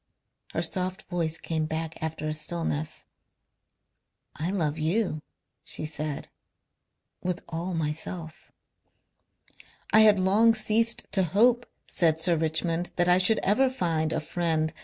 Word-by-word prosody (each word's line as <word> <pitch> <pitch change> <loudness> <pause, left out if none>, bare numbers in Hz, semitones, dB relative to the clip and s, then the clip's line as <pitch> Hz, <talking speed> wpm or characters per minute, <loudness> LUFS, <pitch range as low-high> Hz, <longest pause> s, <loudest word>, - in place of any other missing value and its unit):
Her - - 0
soft 185 +1 -2
voice 165 -2 0
came 160 -1 -2
back 160 +1 -4
after 160 -1 -3
a 155 - -1
stillness. 155 -1 -3 1.3
"I 160 +3 -3
love 160 -6 -1
you," 165 0 0 0.4
she - - -4
said, 150 -1 -3 0.9
"with 180 -1 -3
all 170 +2 -4
myself." 160 +1 -5 1.4
"I - - +8
had 210 -2 +6
long 215 +5 +4
ceased 225 +2 +2
to 195 - +2
hope," 230 +8 +3 0.2
said 160 -3 +2
Sir 170 +1 +3
Richmond, 165 +2 0
"that 175 0 +2
I 180 +1 +5
should 220 +4 +4
ever 260 +7 +3
find 165 -10 -1
a - - 0
friend... 160 -1 -1
170 Hz, 130 wpm, -27 LUFS, 160-190 Hz, 1.4 s, I